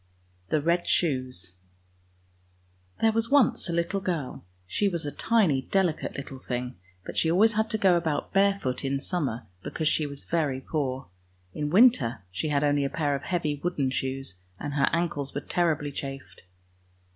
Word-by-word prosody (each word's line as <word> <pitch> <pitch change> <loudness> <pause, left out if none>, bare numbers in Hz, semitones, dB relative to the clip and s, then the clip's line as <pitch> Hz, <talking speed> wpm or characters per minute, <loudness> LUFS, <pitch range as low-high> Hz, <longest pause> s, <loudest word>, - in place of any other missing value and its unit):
61 155 +1 +1
eD - - -15
snoes 130 - 0 1.5
THERE 225 - +5
was 225 +1 0
once 275 -9 +3
a - - 0
little 170 +4 0
girl; 170 - -3 0.2
she 200 - +1
was 170 -4 -3
a 145 - -2
tiny, 190 -13 +2
delicate 180 +1 0
little 135 -1 -7
thing, 125 -1 -4 0.3
but - - -7
she 160 - +3
always 210 +7 +5
had 220 +1 +1
to 220 - +1
go 190 -4 +4
about 160 -3 -1
barefoot 195 -11 +2
in 135 0 0
summer, 135 -8 -2 0.2
because 155 +8 -2
she 155 0 +2
was 140 -1 -6
very 150 -6 0
poor. 135 -2 -2 0.5
In 150 -1 -2
winter 165 - +4
she 150 - -2
only 145 0 +2
had 140 - -1
a - - -8
pair 145 -3 +1
of 140 - -2
heavy 150 -5 -2
wooden 145 -7 0
shoes, 130 -7 -3 0.2
and 145 - -4
her 140 -1 +3
ankles 155 -6 -1
were 145 - -1
terribly 155 -4 0
chafed. 135 -7 -7
150 Hz, 170 wpm, -27 LUFS, 135-175 Hz, 1.5 s, THERE